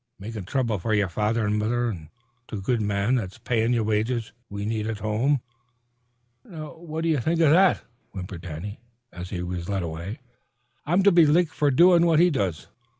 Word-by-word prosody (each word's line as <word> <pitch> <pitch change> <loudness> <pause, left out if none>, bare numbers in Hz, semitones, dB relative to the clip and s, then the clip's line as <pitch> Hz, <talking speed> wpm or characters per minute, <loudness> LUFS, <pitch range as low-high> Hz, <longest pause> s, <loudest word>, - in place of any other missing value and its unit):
"Makin' 105 -1 -7
throuble 115 -2 -1
f'r 105 +1 +1
father 110 +4 0
an' 105 +1 0
mother 120 +3 0
an' 85 -9 -6 0.4
th' 105 -4 -6
good 120 +2 0
man 100 +3 0
that's 100 -6 -2
payin' 120 -1 0
ye 120 -2 +2
wages 110 +2 -1 0.2
we 100 0 -5
need 110 0 -2
at 115 -1 -3
home," 110 +6 0 1.0
added - - -24
Mrs. - - -19
Burke. - - -15
"Now, 155 -1 -8
what 160 -1 -5
do 165 - +1
you 155 -3 +2
think 160 +7 0
of 160 -3 +5
that?" 185 +3 +4 0.3
whimpered 90 -3 -7
Danny, 90 +5 -7 0.3
as 90 0 -7
he 90 -2 -4
was 90 0 -5
led 100 -2 -1
away. 85 +6 -5 0.7
"I'm 175 +5 +3
to 200 - +6
be 170 -3 +6
licked 165 +2 +3
fer 145 - +2
doin' 170 +5 +5
what 165 -2 +4
he 175 +1 +5
does. 95 - -2
110 Hz, 205 wpm, -25 LUFS, 100-145 Hz, 1.0 s, to